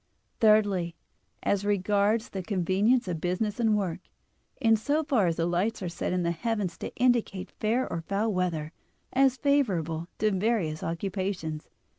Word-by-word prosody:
Thirdly, 205 Hz, -6 st, +3 dB, 0.5 s
as 200 Hz, -1 st, +1 dB
regards 205 Hz, +2 st, +1 dB
the 190 Hz, -, -4 dB
convenience 195 Hz, +5 st, +1 dB
of 170 Hz, -3 st, -3 dB
business 195 Hz, +5 st, -1 dB
and 220 Hz, -3 st, +3 dB
work, 185 Hz, -5 st, -2 dB, 0.6 s
in 225 Hz, -1 st, +4 dB
so 290 Hz, +8 st, 0 dB
far 245 Hz, -, +2 dB
as 165 Hz, -, 0 dB
the 165 Hz, -, 0 dB
lights 185 Hz, +5 st, 0 dB
are 180 Hz, -, -2 dB
set 170 Hz, -, -3 dB
in 180 Hz, -1 st, 0 dB
the 170 Hz, -, +1 dB
heavens 205 Hz, 0 st, -2 dB
to -, -, -5 dB
indicate 240 Hz, -6 st, +1 dB
fair 235 Hz, +4 st, +1 dB
or 165 Hz, -, -3 dB
foul 200 Hz, +5 st, -1 dB
weather, 170 Hz, -4 st, -1 dB, 0.4 s
as 265 Hz, -1 st, +4 dB
favorable 180 Hz, -, +1 dB
to 215 Hz, 0 st, +2 dB
various 190 Hz, -6 st, 0 dB
occupations. 175 Hz, -2 st, -3 dB
200 Hz, 155 wpm, -28 LUFS, 175-225 Hz, 0.6 s, in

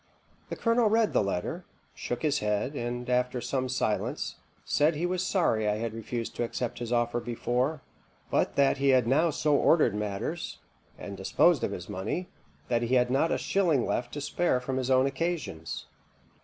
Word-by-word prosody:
The -, -, -3 dB
colonel 230 Hz, -1 st, +2 dB
read 225 Hz, 0 st, +2 dB
the -, -, +4 dB
letter, 100 Hz, -3 st, -2 dB, 0.3 s
shook 120 Hz, -, -4 dB
his 150 Hz, -2 st, +2 dB
head, 105 Hz, +6 st, -1 dB
and, 120 Hz, -2 st, -4 dB
after 125 Hz, 0 st, +1 dB
some 130 Hz, +1 st, -2 dB
silence, 110 Hz, -4 st, -1 dB, 0.3 s
said 150 Hz, +2 st, +2 dB
he 165 Hz, +4 st, -1 dB
was 180 Hz, 0 st, 0 dB
sorry 115 Hz, -, +1 dB
I 105 Hz, -, +1 dB
had 115 Hz, 0 st, -3 dB
refused 115 Hz, +1 st, -4 dB
to -, -, 0 dB
accept 120 Hz, 0 st, -3 dB
his 120 Hz, -1 st, -5 dB
offer 120 Hz, 0 st, +1 dB
before; 125 Hz, +4 st, -1 dB, 0.5 s
but -, -, +1 dB
that 140 Hz, 0 st, +3 dB
he 140 Hz, 0 st, +3 dB
had 130 Hz, -3 st, +5 dB
now 150 Hz, +8 st, +3 dB
so 150 Hz, -1 st, +1 dB
ordered 145 Hz, -5 st, +4 dB
matters, 105 Hz, +10 st, -3 dB, 0.4 s
and -, -, -7 dB
disposed -, -, +3 dB
of -, -, +1 dB
his 90 Hz, -, -6 dB
money, 105 Hz, -, -3 dB, 0.4 s
that 120 Hz, -, +1 dB
he 120 Hz, +2 st, +1 dB
had 125 Hz, 0 st, +3 dB
not 140 Hz, +5 st, +2 dB
a -, -, +2 dB
shilling 170 Hz, -10 st, +1 dB
left 120 Hz, 0 st, -2 dB
to 145 Hz, -, -4 dB
spare 160 Hz, -2 st, +1 dB
from 130 Hz, +1 st, -3 dB
his 130 Hz, 0 st, -1 dB
own 130 Hz, 0 st, +4 dB
occasions. 135 Hz, -, -3 dB
125 Hz, 185 wpm, -28 LUFS, 115-150 Hz, 0.5 s, had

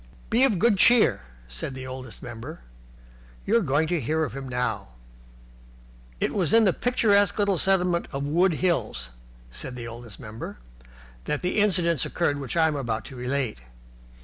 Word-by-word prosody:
"Be 240 Hz, +4 st, +4 dB
of 220 Hz, -8 st, +1 dB
good 205 Hz, +1 st, +3 dB
cheer," 220 Hz, -, +5 dB, 0.3 s
said 60 Hz, -, -5 dB
the 130 Hz, 0 st, -7 dB
Oldest 130 Hz, -2 st, -8 dB
Member. 120 Hz, +7 st, -8 dB, 0.8 s
"You 215 Hz, -, +2 dB
are -, -, +2 dB
going 155 Hz, -2 st, +1 dB
to 175 Hz, -3 st, 0 dB
hear 155 Hz, +6 st, 0 dB
of 150 Hz, -, -4 dB
him 135 Hz, -1 st, -6 dB
now." 115 Hz, -5 st, -2 dB, 1.3 s
It -, -, 0 dB
was 190 Hz, 0 st, +2 dB
in 230 Hz, -, +6 dB
the 190 Hz, -4 st, +3 dB
picturesque 205 Hz, -5 st, +2 dB
little 200 Hz, -4 st, +2 dB
settlement 180 Hz, -3 st, +2 dB
of 135 Hz, +1 st, -3 dB
Wood 170 Hz, +5 st, +2 dB
Hills 155 Hz, -, -1 dB, 0.4 s
(said 125 Hz, -, -5 dB
the 120 Hz, -1 st, -6 dB
Oldest 115 Hz, -2 st, -9 dB
Member) 110 Hz, -1 st, -8 dB, 0.7 s
that 150 Hz, -, -2 dB
the 180 Hz, +4 st, 0 dB
incidents 170 Hz, -7 st, +3 dB
occurred 145 Hz, -5 st, -1 dB
which 135 Hz, +4 st, -4 dB
I 160 Hz, -, +5 dB
am 155 Hz, -, -1 dB
about 115 Hz, -6 st, -3 dB
to 130 Hz, -, -10 dB
relate. 125 Hz, -, -2 dB
150 Hz, 170 wpm, -25 LUFS, 125-185 Hz, 1.3 s, in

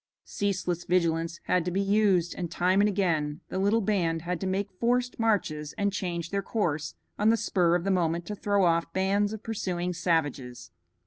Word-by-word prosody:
Ceaseless 185 Hz, -4 st, -2 dB
vigilance 170 Hz, -1 st, 0 dB
had 180 Hz, -2 st, +1 dB
to 180 Hz, -, -2 dB
be 185 Hz, +2 st, -1 dB
used, 195 Hz, -3 st, +2 dB
and 175 Hz, -2 st, -4 dB
time 185 Hz, +4 st, +2 dB
and 205 Hz, -, +4 dB
again 165 Hz, -7 st, 0 dB
the 190 Hz, -, -3 dB
little 205 Hz, +4 st, +2 dB
band 170 Hz, -6 st, 0 dB
had 180 Hz, 0 st, -3 dB
to 190 Hz, -, -1 dB
make 195 Hz, +2 st, -1 dB
forced 245 Hz, +5 st, 0 dB
marches 170 Hz, -10 st, 0 dB
and 200 Hz, -1 st, 0 dB
change 170 Hz, -4 st, -3 dB
their 200 Hz, 0 st, 0 dB
course 170 Hz, -8 st, -2 dB, 0.2 s
on 210 Hz, +1 st, +4 dB
the 230 Hz, -, +4 dB
spur 175 Hz, -5 st, +2 dB
of 175 Hz, -, 0 dB
the 195 Hz, -, 0 dB
moment 170 Hz, -2 st, 0 dB
to 210 Hz, -, -5 dB
throw 200 Hz, -1 st, +1 dB
off 165 Hz, -1 st, +1 dB
bands 200 Hz, +2 st, +1 dB
of 220 Hz, -1 st, -7 dB
pursuing 180 Hz, -5 st, -2 dB
savages. 145 Hz, -, -2 dB
180 Hz, 190 wpm, -28 LUFS, 170-200 Hz, 0.2 s, and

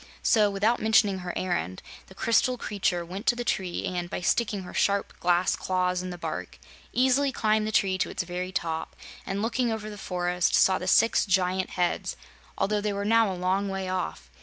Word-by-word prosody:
So, 210 Hz, -2 st, +4 dB
without 205 Hz, +4 st, +1 dB
mentioning 215 Hz, -3 st, +3 dB
her 180 Hz, -1 st, -4 dB
errand, 175 Hz, -, -2 dB, 0.2 s
the 190 Hz, -, -15 dB
crystal 250 Hz, +4 st, +2 dB
creature 190 Hz, -6 st, -1 dB
went 190 Hz, +6 st, -7 dB
to 240 Hz, -, +4 dB
the 240 Hz, -, -3 dB
tree 185 Hz, -6 st, -2 dB
and, 175 Hz, -1 st, -3 dB
by -, -, -3 dB
sticking 205 Hz, +2 st, 0 dB
her 180 Hz, -, -10 dB
sharp 200 Hz, 0 st, +1 dB
glass 175 Hz, +1 st, +2 dB
claws 180 Hz, -1 st, 0 dB
in 185 Hz, -, -5 dB
the 175 Hz, -, -6 dB
bark, -, -, -5 dB, 0.3 s
easily 265 Hz, +2 st, +3 dB
climbed 215 Hz, -3 st, +1 dB
the -, -, -2 dB
tree 190 Hz, -2 st, +2 dB
to -, -, 0 dB
its -, -, -3 dB
very 180 Hz, +1 st, -4 dB
top 165 Hz, -3 st, -3 dB, 0.3 s
and, 195 Hz, +2 st, -2 dB
looking 235 Hz, +1 st, 0 dB
over 215 Hz, -1 st, -4 dB
the 205 Hz, -, -9 dB
forest, 180 Hz, -1 st, 0 dB
saw 190 Hz, -1 st, +4 dB
the 180 Hz, -, -5 dB
six 225 Hz, +4 st, +4 dB
giant 185 Hz, 0 st, +1 dB
heads, 175 Hz, -1 st, -1 dB, 0.4 s
although 205 Hz, +2 st, 0 dB
they 210 Hz, 0 st, -1 dB
were 200 Hz, 0 st, -3 dB
now 225 Hz, -1 st, +4 dB
a 185 Hz, -, -5 dB
long 190 Hz, +2 st, 0 dB
way 190 Hz, -1 st, -3 dB
off. 185 Hz, 0 st, -4 dB
190 Hz, 200 wpm, -27 LUFS, 180-215 Hz, 0.4 s, So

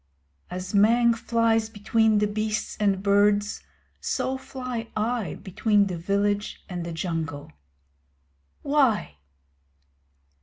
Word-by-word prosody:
As 185 Hz, +2 st, -6 dB
Mang 230 Hz, +4 st, +5 dB
flies 230 Hz, -1 st, +1 dB
between 220 Hz, +1 st, +2 dB
the 210 Hz, -, +3 dB
beasts 215 Hz, +1 st, -2 dB
and 200 Hz, -2 st, +1 dB
birds 205 Hz, +1 st, +2 dB, 0.4 s
so 260 Hz, -, -1 dB
fly 255 Hz, -3 st, -5 dB
I 225 Hz, -1 st, -1 dB
between 205 Hz, +1 st, +1 dB
the 180 Hz, -3 st, -4 dB
village 200 Hz, +3 st, -1 dB
and 180 Hz, -3 st, -5 dB
the 170 Hz, -, -5 dB
Jungle. 165 Hz, -, -4 dB, 1.1 s
Why? 265 Hz, -, +1 dB
210 Hz, 105 wpm, -25 LUFS, 195-230 Hz, 1.1 s, Mang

